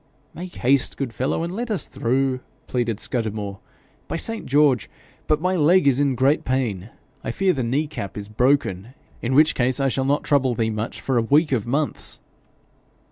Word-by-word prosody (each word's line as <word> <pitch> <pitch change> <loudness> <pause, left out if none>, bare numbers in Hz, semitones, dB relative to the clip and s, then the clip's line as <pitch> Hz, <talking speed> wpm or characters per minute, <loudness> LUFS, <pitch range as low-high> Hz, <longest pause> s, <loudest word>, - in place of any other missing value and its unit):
'Make 180 +1 -8
haste, 130 +1 +2
my - - -19
good 120 - -11
fellow, 130 +7 -1
and 170 +1 -3
let 240 +2 -3
us 210 -4 -1
through,' 130 +2 0 0.3
pleaded 120 -4 -1
Scudamore. 105 -4 -3 0.5
'By - - -3
Saint 225 +7 -4
George! 140 -3 +3 0.4
but 155 0 +2
my 185 +3 0
leg 175 +2 +4
is 135 -1 +4
in 140 -2 +2
great 135 +5 +2
pain. 115 -7 -1 0.3
I - - -3
fear 185 +10 +1
the 135 - -2
knee 130 +6 0
cap 100 -11 -6
is 100 -1 -6
broken, 120 -1 0 0.3
in 125 +3 0
which 155 +2 +6
case 130 +1 0
I 135 0 +2
shall 130 +1 -1
not 145 +2 +1
trouble 130 -4 +2
thee 110 -1 0
much 110 +2 -4
for 130 -3 +1
a - - +2
week 145 +7 +3
of 120 -4 0
months.' 145 +4 -2
130 Hz, 190 wpm, -23 LUFS, 115-150 Hz, 0.5 s, which